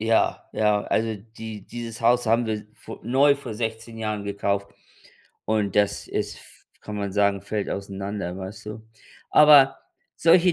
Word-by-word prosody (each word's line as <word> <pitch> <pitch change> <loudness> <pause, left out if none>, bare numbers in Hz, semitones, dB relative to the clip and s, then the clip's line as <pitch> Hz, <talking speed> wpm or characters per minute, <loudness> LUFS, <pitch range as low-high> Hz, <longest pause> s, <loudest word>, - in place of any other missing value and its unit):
Ja, 110 +1 +1
ja, 105 -1 +2
also, 110 -1 0 0.2
die 110 -3 -7
dieses 115 -2 -7
Haus 120 +1 +3
haben 115 +1 +3
wir 110 - 0
s 105 - -5
vor - - -10
neu 140 +3 +4
vor 125 -6 -7
16 115 0 -4
Jahren 105 -2 -3
gekauft 100 0 -1 0.8
und 105 -2 0
das 105 -1 +1
ist - - -2
f - - -15 0.3
kann 105 -1 -7
man 100 -1 -3
sagen, 100 -1 +2
fällt 105 -2 -3
auseinander, 100 -2 -4
weißt 105 +3 -8
du? 110 +1 -7 0.5
Aber 145 -3 +7 0.4
solche 170 +2 +5
110 Hz, 160 wpm, -24 LUFS, 100-115 Hz, 0.8 s, Aber